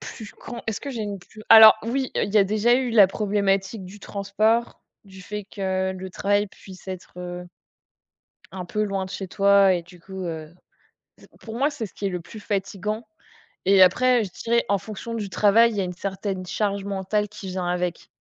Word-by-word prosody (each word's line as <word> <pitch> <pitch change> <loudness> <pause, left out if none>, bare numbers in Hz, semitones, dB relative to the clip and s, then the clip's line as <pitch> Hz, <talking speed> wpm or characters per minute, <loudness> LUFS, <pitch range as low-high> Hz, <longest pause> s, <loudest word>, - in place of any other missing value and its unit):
plus 220 -2 -9
qu'on 235 - -9
est-ce 220 -2 -3
que 285 - -7
j'ai 235 -5 -4
une 205 -1 -4
plus 215 +4 -15
alors 220 -1 +11
oui! 260 +3 -2
Heu, - - +1
il 200 - -6
y - - +7
a 200 - +5
déjà 215 +4 +2
eu 255 -1 0
la 210 -4 +7
problématique 195 0 -1
du 200 +3 -12
transport, 215 +4 0 0.2
du 190 -1 -14
fait 210 +2 -6
que 190 -1 -2
le 185 0 -8
travail 205 +2 +1
puisse 190 -1 -14
être, 185 -1 -8
heu, 180 0 -6 1.1
un 185 -1 -6
peu 210 +4 -2
loin 195 -2 -2
de 185 - -10
chez 195 - -5
toi 200 0 +4
et 175 - -2
du 175 +1 -16
coup, 190 +2 -8
heu, 160 -2 -6 0.9
pour 225 0 -8
moi 280 +3 +3
c'est 275 -6 -5
ce - - -17
qui 200 - -4
est - - +1
le 180 -2 -4
plus 215 +6 -11
fatigant 205 +2 -3 0.6
et 195 -1 +6
après, 245 +6 +5
je 195 - -6
dirais 235 +1 +2
en 200 - +3
fonction 220 +4 -7
du 215 -3 -3
travail, 220 +4 +4
il 215 - -5
y 195 - +1
a - - 0
une 180 -1 -4
certaine 190 0 -4
charge 200 +1 -2
mentale 200 +1 -1
qui 195 - -9
vient 185 -1 -3
avec. 180 -1 -2
200 Hz, 210 wpm, -24 LUFS, 190-215 Hz, 1.1 s, alors